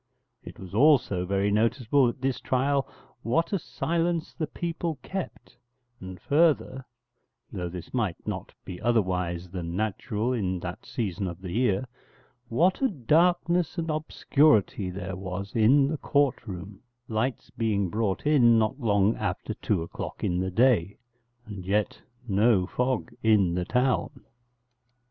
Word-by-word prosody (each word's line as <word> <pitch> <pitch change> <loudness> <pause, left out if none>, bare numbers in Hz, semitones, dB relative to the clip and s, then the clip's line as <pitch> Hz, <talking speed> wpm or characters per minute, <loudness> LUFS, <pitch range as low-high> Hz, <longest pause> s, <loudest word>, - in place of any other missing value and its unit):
It - - -11
was 95 -1 -10
also 120 -8 +3
very 100 +1 +1
noticeable 120 +4 +2
at 120 - -8
this 135 -1 -1
trial 135 +1 +1 0.3
what 165 - 0
a 195 - +1
silence 170 0 -2
the 155 -3 -3
people 165 -1 -3
kept, 190 -2 -6 0.4
and 95 -1 -9
further 145 -4 +2 0.7
(though 90 -4 -4
this 90 -1 -9
might 110 -9 0
not - - -4
be 90 -1 -8
otherwise 90 -6 0
than 85 -2 -5
natural 110 +3 -1
in 95 -6 -1
that 90 +2 -7
season 95 -5 -3
of 85 -1 -6
the 90 -2 -7
year), 120 +2 +1 0.6
what 175 - +2
a 270 - +4
darkness 170 - +2
and 165 -1 -1
obscurity 145 -9 +2
there 90 0 -5
was 95 +2 -6
in 130 +5 +5
the 155 +2 -2
court 140 -5 +1
room, 95 +1 -8 0.3
lights 115 +4 -2
being 105 -4 0
brought 105 0 -1
in 125 -6 +5
not 110 +5 0
long 105 -3 +2
after 105 +1 -3
two 100 -5 -1
o'clock 85 - -7
in 90 0 0
the 95 0 -1
day, 105 -2 +2 0.5
and 100 -3 -8
yet 100 +3 -1 0.3
no 100 -1 +3
fog 125 +4 -2
in 105 -6 +3
the 90 0 -1
town. 130 +3 0
110 Hz, 145 wpm, -27 LUFS, 95-140 Hz, 0.7 s, in